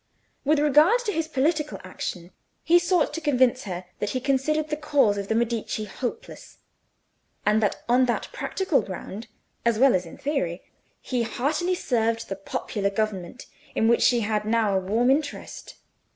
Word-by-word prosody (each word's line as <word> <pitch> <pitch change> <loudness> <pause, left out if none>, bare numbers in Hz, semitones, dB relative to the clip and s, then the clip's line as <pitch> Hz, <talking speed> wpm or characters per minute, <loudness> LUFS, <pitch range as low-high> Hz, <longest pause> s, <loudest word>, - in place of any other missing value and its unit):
With 300 +2 +3
regard 300 - +5
to 420 - 0
his 325 -2 -1
political 300 +1 0
action 180 -1 -6 0.3
he 345 +2 +5
sought 345 -3 +1
to 330 - -4
convince 255 -4 +2
her 180 -2 -5
that 210 - -1
he 255 - -1
considered 290 +4 0
the 300 - 0
cause 285 -8 +2
of 200 -1 -4
the 220 - 0
Medici 230 -2 -1
hopeless; 255 - -7 0.9
and 210 +1 +3
that 210 - -1
on 250 +2 +4
that 240 - -1
practical 380 - 0
ground, 195 +3 -7 0.4
as 235 -2 +2
well 265 +2 +5
as 180 -2 0
in - - -11
theory, 185 - -2 0.4
he 250 -2 -2
heartily 300 +10 0
served 230 -7 -1
the 195 - -2
popular 200 +1 -3
government, 200 +1 -3 0.3
in 225 - +2
which 235 - +4
she 240 -2 +4
had 210 0 0
now 215 -2 +1
a - - +3
warm 225 +7 +2
interest. 285 +1 -3
245 Hz, 165 wpm, -25 LUFS, 210-300 Hz, 0.9 s, regard